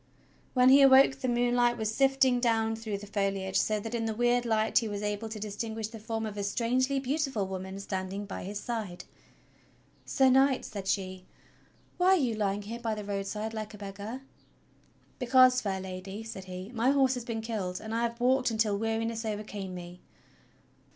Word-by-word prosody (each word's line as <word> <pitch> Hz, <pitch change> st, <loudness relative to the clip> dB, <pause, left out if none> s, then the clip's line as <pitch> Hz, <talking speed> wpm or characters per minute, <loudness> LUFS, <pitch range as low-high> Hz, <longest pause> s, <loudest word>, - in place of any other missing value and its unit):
'When 250 Hz, 0 st, +6 dB
he 275 Hz, +2 st, +8 dB
awoke 270 Hz, 0 st, +7 dB
the 260 Hz, -, -2 dB
moonlight 240 Hz, 0 st, +2 dB
was 220 Hz, -1 st, -2 dB
sifting 270 Hz, -1 st, +3 dB
down 225 Hz, -2 st, +1 dB
through 220 Hz, -2 st, -4 dB
the 205 Hz, -, -9 dB
foliage, 195 Hz, -2 st, -2 dB
so 215 Hz, -1 st, +1 dB
that 225 Hz, +3 st, -6 dB
in 230 Hz, -1 st, -1 dB
the 220 Hz, -1 st, -2 dB
weird 240 Hz, +1 st, +2 dB
light 220 Hz, -1 st, +3 dB
he 230 Hz, -, -3 dB
was 205 Hz, -1 st, -4 dB
able 210 Hz, +2 st, -2 dB
to 215 Hz, -1 st, -6 dB
distinguish 215 Hz, +1 st, -4 dB
the 225 Hz, -1 st, -9 dB
form 225 Hz, +1 st, -3 dB
of 210 Hz, -1 st, -6 dB
a 200 Hz, -, -2 dB
strangely 250 Hz, +6 st, +1 dB
beautiful 270 Hz, -5 st, -1 dB
woman 190 Hz, 0 st, -6 dB
standing 195 Hz, +1 st, -4 dB
by 200 Hz, -, -6 dB
his 200 Hz, +2 st, -5 dB
side. 215 Hz, -6 st, -4 dB, 1.0 s
"Sir 265 Hz, -1 st, +3 dB
Knight," 265 Hz, 0 st, +3 dB
said 200 Hz, -3 st, -6 dB
she, 185 Hz, -2 st, -2 dB, 0.7 s
"why 370 Hz, +1 st, +5 dB
are -, -, +2 dB
you 255 Hz, -8 st, +1 dB
lying 205 Hz, -1 st, -1 dB
here 230 Hz, +3 st, -6 dB
by 225 Hz, -2 st, -2 dB
the 210 Hz, -1 st, -6 dB
road 200 Hz, -1 st, -3 dB
side 215 Hz, +2 st, -4 dB
like 215 Hz, -1 st, -5 dB
a -, -, -11 dB
beggar.?" 205 Hz, +5 st, -7 dB, 1.0 s
"Because, 255 Hz, 0 st, +5 dB
fair 195 Hz, -2 st, -2 dB
Lady," 190 Hz, +3 st, -7 dB
said 195 Hz, -4 st, -8 dB
he, 185 Hz, +3 st, -7 dB
"my 235 Hz, +2 st, +2 dB
horse 270 Hz, -2 st, +4 dB
has 250 Hz, -2 st, -4 dB
been 230 Hz, -1 st, -4 dB
killed, 205 Hz, -5 st, -3 dB
and 220 Hz, 0 st, -6 dB
I 230 Hz, -, 0 dB
have 235 Hz, 0 st, -2 dB
walked 255 Hz, +1 st, +3 dB
until 215 Hz, -3 st, +1 dB
weariness 225 Hz, +1 st, -1 dB
overcame 205 Hz, -3 st, -5 dB
me." 175 Hz, 0 st, -9 dB
220 Hz, 190 wpm, -29 LUFS, 200-245 Hz, 1.0 s, he